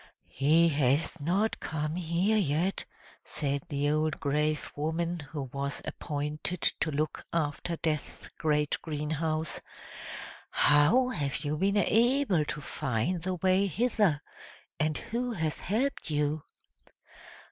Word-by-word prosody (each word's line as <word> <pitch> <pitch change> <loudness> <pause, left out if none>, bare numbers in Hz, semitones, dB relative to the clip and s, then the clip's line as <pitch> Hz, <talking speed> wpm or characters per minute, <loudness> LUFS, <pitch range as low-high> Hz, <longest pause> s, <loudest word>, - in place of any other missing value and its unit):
"He 160 +5 +4
has 140 +1 +1
not 185 +9 +1
come 155 0 -3
here 180 +5 +1
yet!" 180 -1 +1 0.4
said 140 -1 -2
the 145 0 +1
old 155 +1 0
grave 150 +1 0
woman, 165 +3 -1
who 145 -1 -5
was 140 +1 -2
appointed 150 +4 -3 0.2
to 160 - +1
look 155 +1 -2
after 165 +1 -1
Death's 155 -2 -3
great 150 -2 +1
greenhouse! 155 0 -2 0.9
"How 150 - +5
have 150 - -2
you 145 +1 0
been 195 +5 +2
able 230 - +3
to 150 0 -4
find 135 +5 -1
the 185 +2 -1
way 185 +3 +3
hither? 200 -5 +1 0.6
And 155 -1 +1
who 240 +1 -3
has 160 -6 -2
helped 240 +6 -1
you?" 150 0 0
155 Hz, 120 wpm, -30 LUFS, 145-180 Hz, 0.9 s, How